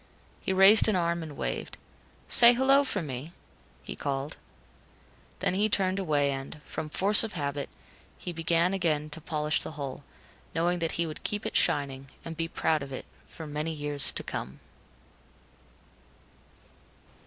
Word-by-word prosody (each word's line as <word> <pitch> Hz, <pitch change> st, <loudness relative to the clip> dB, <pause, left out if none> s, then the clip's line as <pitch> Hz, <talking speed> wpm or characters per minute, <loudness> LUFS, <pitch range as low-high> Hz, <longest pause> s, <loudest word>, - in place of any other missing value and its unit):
He -, -, -3 dB
raised 195 Hz, +4 st, +7 dB
an 215 Hz, -, +2 dB
arm 170 Hz, -1 st, 0 dB
and 155 Hz, -3 st, -8 dB
waved. -, -, -4 dB, 0.5 s
"Say 240 Hz, 0 st, +8 dB
'hello' 270 Hz, +3 st, +4 dB
for 205 Hz, -9 st, -2 dB
me," 140 Hz, +3 st, -7 dB, 0.5 s
he -, -, -7 dB
called. 140 Hz, 0 st, -4 dB, 1.1 s
Then -, -, 0 dB
he 205 Hz, +3 st, +1 dB
turned 190 Hz, -1 st, +1 dB
away 145 Hz, -6 st, +1 dB
and, 135 Hz, +2 st, -6 dB
from 155 Hz, -, -6 dB
force 200 Hz, +7 st, +5 dB
of 220 Hz, -, -5 dB
habit, 145 Hz, -4 st, -4 dB, 0.5 s
he 180 Hz, -, -6 dB
began 165 Hz, +2 st, +1 dB
again 155 Hz, -5 st, -1 dB
to 160 Hz, -, -7 dB
polish 150 Hz, -1 st, -1 dB
the -, -, -7 dB
hull, 140 Hz, -1 st, -6 dB, 0.5 s
knowing 175 Hz, +2 st, 0 dB
that 165 Hz, -1 st, -2 dB
he 170 Hz, -, -1 dB
would 155 Hz, -2 st, -8 dB
keep 210 Hz, +1 st, -2 dB
it -, -, -4 dB
shining, 135 Hz, -1 st, +1 dB, 0.2 s
and 165 Hz, -, -6 dB
be 165 Hz, +1 st, -2 dB
proud 160 Hz, -2 st, 0 dB
of 140 Hz, 0 st, -8 dB
it, 130 Hz, -, -6 dB, 0.2 s
for 160 Hz, -, -10 dB
many 150 Hz, +2 st, -4 dB
years 145 Hz, -2 st, +1 dB
to -, -, -1 dB
come. 65 Hz, +2 st, -6 dB
160 Hz, 155 wpm, -28 LUFS, 145-185 Hz, 1.1 s, Say